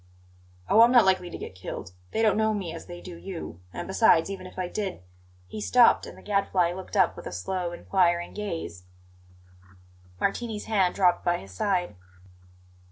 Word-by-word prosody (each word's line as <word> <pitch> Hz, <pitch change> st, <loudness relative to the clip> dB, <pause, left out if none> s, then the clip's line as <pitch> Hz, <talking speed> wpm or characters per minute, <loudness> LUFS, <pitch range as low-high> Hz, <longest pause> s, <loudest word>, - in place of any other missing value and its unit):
"Oh, 225 Hz, -, +6 dB
I'm 235 Hz, +1 st, +7 dB
not 240 Hz, -4 st, +7 dB
likely 185 Hz, -2 st, +2 dB
to -, -, -7 dB
get -, -, -8 dB
killed! 95 Hz, 0 st, -7 dB, 0.2 s
They 225 Hz, -, 0 dB
don't 215 Hz, -3 st, +4 dB
know 220 Hz, 0 st, +2 dB
me 180 Hz, -5 st, -4 dB
as 165 Hz, -, -9 dB
they 175 Hz, 0 st, -9 dB
do 180 Hz, -2 st, -9 dB
you. 170 Hz, -, -7 dB
And, -, -, -6 dB
besides, 190 Hz, -3 st, +4 dB
even 185 Hz, -2 st, -7 dB
if 185 Hz, -, -15 dB
I 185 Hz, -1 st, -2 dB
did 190 Hz, -, -4 dB, 0.2 s
" 90 Hz, 0 st, -30 dB
He 215 Hz, -, -7 dB
stopped, 245 Hz, +2 st, +5 dB
and -, -, -11 dB
the -, -, -15 dB
Gadfly 195 Hz, -4 st, +1 dB
looked 190 Hz, +3 st, -6 dB
up 190 Hz, -3 st, +4 dB
with -, -, -8 dB
a -, -, -6 dB
slow, 175 Hz, -, -3 dB
inquiring 175 Hz, -1 st, +1 dB
gaze. 165 Hz, -, -5 dB, 1.3 s
Martini's 215 Hz, +1 st, -2 dB
hand 195 Hz, -5 st, +1 dB
dropped 180 Hz, -3 st, +3 dB
by 175 Hz, 0 st, +2 dB
his 95 Hz, -, -12 dB
side. 180 Hz, -, -1 dB
185 Hz, 185 wpm, -27 LUFS, 170-205 Hz, 1.3 s, I'm